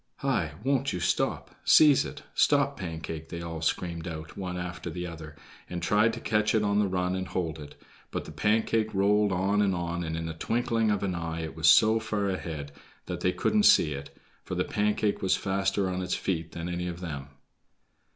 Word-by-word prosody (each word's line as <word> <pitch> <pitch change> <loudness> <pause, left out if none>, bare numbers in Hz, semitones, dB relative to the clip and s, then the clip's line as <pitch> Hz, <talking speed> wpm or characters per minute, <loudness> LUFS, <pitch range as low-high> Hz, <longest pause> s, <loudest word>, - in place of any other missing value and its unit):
"Hi! 100 - -1
won't 135 -2 +1
you 90 - -2
stop? - - 0
Seize 150 -3 +6
it. - - -8
Stop, 140 -1 +3
Pancake," 80 - -6
they 85 -1 -5
all 85 -1 -5
screamed 85 0 -2
out, 80 -2 -7
one 90 -2 -4
after 85 -1 -5
the 90 +2 -5
other, 80 -3 -8 0.3
and 90 - -3
tried 105 +6 +3
to 115 - -5
catch 105 -1 +1
it 110 - +3
on 100 0 +2
the 105 - +3
run 90 -1 -1
and 95 0 -3
hold 80 -4 -3
it; 75 -1 -10 0.3
but - - -4
the - - -9
Pancake 110 +5 +1
rolled 100 +1 +3
on 95 +3 +1
and 100 -2 +2
on, 85 0 -3
and 80 0 -3
in 80 - -3
the 80 - -4
twinkling 115 +5 0
of 100 -2 0
an 95 -2 0
eye 85 -1 -3
it 80 -1 -6
was 80 -1 +1
so 110 +6 +6
far 105 -2 -1
ahead 80 -6 -5 0.3
that - - -4
they 90 - +2
couldn't 215 - +1
see 80 - +5
it, 70 0 -7 0.3
for - - -5
the - - +1
Pancake 105 0 0
was 95 - +3
faster 95 0 0
on 90 0 -2
its 90 0 -1
feet 85 -3 -3
than 85 0 -5
any 90 0 -3
of 85 -1 -5
them. 75 -6 -5
90 Hz, 210 wpm, -28 LUFS, 80-105 Hz, 0.3 s, Seize